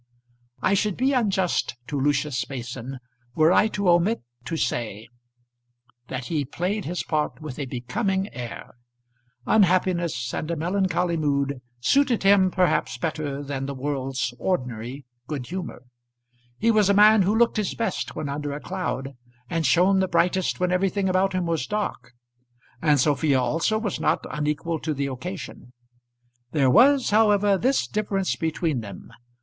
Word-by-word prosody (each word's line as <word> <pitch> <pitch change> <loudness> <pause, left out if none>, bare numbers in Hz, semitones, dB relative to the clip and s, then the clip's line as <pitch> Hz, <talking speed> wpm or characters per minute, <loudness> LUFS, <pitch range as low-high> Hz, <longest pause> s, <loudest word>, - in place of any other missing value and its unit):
I 190 - +3
should 200 -1 +1
be 265 +3 +2
unjust 195 - +1
to 145 0 -3
Lucius 140 -3 0
Mason 125 0 -6 0.4
were 160 +2 +5
I 215 - +5
to 200 -3 -2
omit 175 - +3 0.2
to 165 - -3
say 115 -6 -2 1.0
that 130 0 -5
he 150 +1 -1
played 180 +9 -3
his 175 +4 -3
part 150 -2 -2
with 150 -4 -7
a 140 - -3
becoming 190 - -2
air. 120 -2 -7 0.7
Unhappiness 175 - +2
and 155 - -3
a 170 - -1
melancholy 180 +1 0
mood 140 -3 0 0.2
suited 265 - +2
him 195 -1 +5
perhaps 180 -1 +1
better 150 -3 -3
than 135 -1 -4
the 140 - -4
world's 135 -2 -2
ordinary 125 -5 -3 0.2
good 140 -5 -4
humour. 175 -5 -6 0.7
He 230 +1 +3
was 210 -3 +3
a 200 - +4
man 210 +1 +7
who 200 +4 +2
looked 235 -1 +3
his 210 -2 -1
best 230 - -3
when 150 - -3
under 145 +1 -3
a 145 - -5
cloud, 145 -7 -4 0.4
and 165 -3 +1
shone 185 +7 +4
the 190 - +2
brightest 180 +1 +1
when 180 0 +1
everything 190 +1 +1
about 185 +1 +2
him 185 -1 0
was 165 -6 -1
dark. 165 - -3 0.7
And 150 -3 +3
Sophia 140 0 +2
also 165 - +1
was 220 -4 -3
not - - +1
unequal 150 +2 -2
to 155 0 -3
the 140 0 -1
occasion. 140 -1 -7 0.8
There 135 -4 +3
was, 265 - +5
however, 205 -2 +4
this 255 +8 +1
difference 200 -3 -1
between 160 -3 -1
them. 105 +1 -10
165 Hz, 155 wpm, -24 LUFS, 140-195 Hz, 1.0 s, man